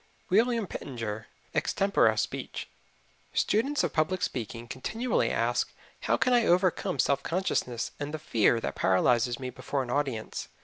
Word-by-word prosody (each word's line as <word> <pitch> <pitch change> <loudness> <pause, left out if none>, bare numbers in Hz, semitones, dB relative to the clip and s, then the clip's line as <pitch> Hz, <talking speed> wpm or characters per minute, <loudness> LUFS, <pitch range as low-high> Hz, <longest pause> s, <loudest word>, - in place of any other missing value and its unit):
WILLIAM 230 +2 +3
PITTENGER, 115 - -5 0.3
Extempore 195 - +2
Speech. 110 - -3 0.6
Students 275 +8 +2
of - - -1
public 170 +4 +1
speaking 115 -1 -3
continually 225 - -1
ask, - - 0 0.3
"How - - +1
can 255 - +2
I 240 -2 +4
overcome 180 -4 +2
self 140 +1 +2
consciousness 150 -10 -1
and 145 0 -3
the 155 - -3
fear 115 -5 +2
that - - -2
paralyzes 120 +5 +2
me 130 -1 -5
before 140 +1 -2
an 120 - -6
audience?" 135 -5 -2
140 Hz, 140 wpm, -29 LUFS, 120-190 Hz, 0.6 s, I